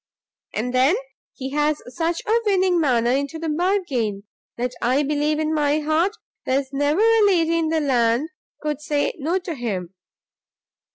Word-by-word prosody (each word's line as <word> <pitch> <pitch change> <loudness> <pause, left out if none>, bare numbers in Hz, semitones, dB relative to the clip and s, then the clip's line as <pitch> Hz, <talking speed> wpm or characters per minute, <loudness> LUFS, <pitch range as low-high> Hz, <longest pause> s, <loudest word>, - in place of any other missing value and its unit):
And 245 +4 -2
then 260 +7 +4 0.4
he 265 0 -6
has 295 +1 +1 0.2
such 335 0 -1
a 450 +2 +3
winning 375 -3 +3
manner 240 -5 +2
into 280 +4 -1
the 325 0 -3
bargain, 300 - 0 0.3
that 245 +1 -2
I 260 +4 +2
believe 300 +1 0
in 310 0 0
my 295 -1 +2
heart 320 +7 +1 0.3
there's 270 +1 -1
never 290 +6 +1
a 450 -1 +5
lady 335 -3 +2
in 325 - 0
the 320 -1 +1
land 245 +1 +2 0.3
could 300 -1 -2
say 295 -1 0
no 325 +6 0
to 360 -2 -4
him. 195 - -4
300 Hz, 160 wpm, -22 LUFS, 260-330 Hz, 0.4 s, a